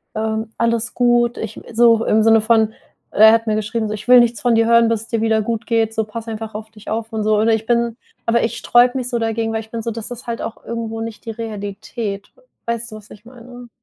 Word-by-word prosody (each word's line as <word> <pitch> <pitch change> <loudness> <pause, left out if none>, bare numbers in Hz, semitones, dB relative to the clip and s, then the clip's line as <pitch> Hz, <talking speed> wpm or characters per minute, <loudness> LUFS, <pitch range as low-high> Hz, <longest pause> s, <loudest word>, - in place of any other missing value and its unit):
ähm, 220 0 -2
alles 230 0 0
gut.“ 240 -1 +2
Ich 220 -1 -6
so 230 0 +4
im 215 0 +3
Sinne 225 0 +6
von 220 0 +2 0.4
er 220 +1 +8
hat 230 0 +2
mir 215 - +1
geschrieben 215 +1 -2
so: 210 - -3
„Ich 210 - -10
will 250 0 +8
nichts 240 -2 +2
von 240 -2 +2
dir 225 0 +3
hören, 235 0 +5
bis 225 -2 0
es - - -12
dir 230 -2 -1
wieder 220 -1 +2
gut 230 +1 -3
geht, 225 -2 +1
so, 220 0 0
pass 225 +2 -8
einfach 220 -1 -6
auf 220 +1 -7
dich 215 -1 -12
auf 225 +1 -4
und 220 -1 -1
so.“ 215 0 +2
Oder 220 +2 +3
ich 220 0 -1
bin 235 -1 +1 0.3
aber 235 0 +2
ich 230 0 -2
sträube 245 +3 +3
mich 250 -2 -3
so 240 -2 -1
dagegen, 225 0 -1
weil 220 - -1
ich 220 - -15
bin 230 -1 -4
so 230 - -2
das 225 +1 -7
ist 245 0 -8
halt 235 0 -3
auch 225 - -7
irgendwo 225 -1 -4
nicht 225 -1 -7
die - - -6
Realität. 205 -1 -6 0.3
Weißt 235 0 -2
du, - - -8
was 210 -1 -16
ich 210 - -14
meine? 245 0 -13
225 Hz, 255 wpm, -19 LUFS, 220-235 Hz, 0.4 s, er